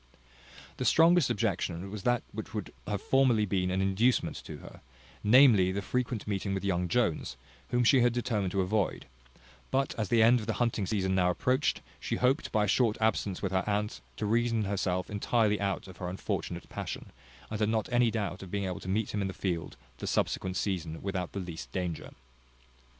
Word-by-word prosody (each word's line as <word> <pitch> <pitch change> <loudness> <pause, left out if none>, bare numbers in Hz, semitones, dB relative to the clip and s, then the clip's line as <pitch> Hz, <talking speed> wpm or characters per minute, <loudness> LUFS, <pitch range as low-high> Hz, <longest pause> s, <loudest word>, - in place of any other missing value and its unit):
The - - -2
strongest 165 -2 +5
objection 95 -3 -1
was 105 -1 -5
that 120 +3 +1
which - - -7
would - - -4
have 105 -1 -2
formerly 130 -5 +3
been 90 -2 0
an 95 +1 0
inducement 105 +5 +2
to - - -7
her, - - -13 0.4
namely, 110 -5 +6
the 100 +1 -3
frequent 125 0 -2
meeting 100 -1 -1
with 95 - -3
young 90 -2 0
Jones, 85 - 0 0.3
whom 120 0 +2
she 125 +2 +5
had 120 0 +4
determined 115 -6 -1
to 100 - +2
avoid; 100 +2 0 0.6
but 135 +1 0
as 105 - -1
the 115 -2 +5
end 120 +2 +6
of 110 - -7
the 115 - 0
hunting 115 -5 0
season 95 -3 0
now 90 -1 +3
approached, 130 - +1 0.2
she - - -2
hoped, 130 +6 +1
by 105 -2 +2
a - - +1
short 110 +1 +2
absence 105 -4 0
with 95 - -1
her 95 0 +1
aunt, 105 0 -1 0.2
to 110 - -2
reason 115 +1 +1
herself 95 -2 -1
entirely 105 0 +1
out 100 -1 -2
of 95 - -12
her 90 - -4
unfortunate 90 -2 -4
passion; - - -6 0.4
and 110 - -3
had 105 -1 +2
not 110 -1 0
any 120 -1 +4
doubt 105 -5 -3
of 95 - -9
being 100 +1 -2
able 90 -1 -3
to 95 - -7
meet 105 +2 -1
him 105 - -1
in 100 - 0
the 95 - -6
field 85 -5 -3 0.2
the - - -5
subsequent 95 0 0
season 85 -5 -2
without 95 -3 -3
the 100 - -3
least 85 -3 -7
danger. 90 -3 -3
105 Hz, 200 wpm, -30 LUFS, 95-115 Hz, 0.6 s, namely